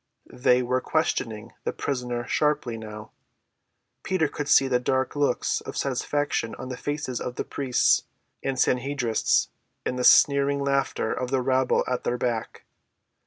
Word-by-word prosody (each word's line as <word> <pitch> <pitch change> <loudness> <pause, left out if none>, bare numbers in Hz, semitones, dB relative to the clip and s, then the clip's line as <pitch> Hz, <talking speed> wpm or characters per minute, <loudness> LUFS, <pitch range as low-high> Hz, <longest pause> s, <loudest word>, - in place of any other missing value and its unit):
They 125 0 +3
were 130 +1 0
questioning 115 -9 -1
the - - -1
prisoner 125 -3 -3
sharply 150 -3 0
now. 105 -1 -9 0.9
Peter 185 -5 +1
could 145 0 -5
see 135 - +6
the 125 -2 +2
dark 130 +2 0
looks 145 -3 0
of - - -7
satisfaction 145 -6 -1
on 130 - -8
the 125 - -4
faces 145 -2 -3
of 125 - -4
the - - -2
priests 130 -3 +2 0.4
and 135 -1 -2
Sanhedrists 125 -2 +1 0.4
and 125 - -2
the - - 0
sneering 140 +1 +5
laughter 140 -5 0
of 125 - -3
the 130 -1 0
rabble 130 0 +2
at 125 -1 -2
their 125 - -1
back. 120 -2 -3
130 Hz, 150 wpm, -25 LUFS, 125-140 Hz, 0.9 s, see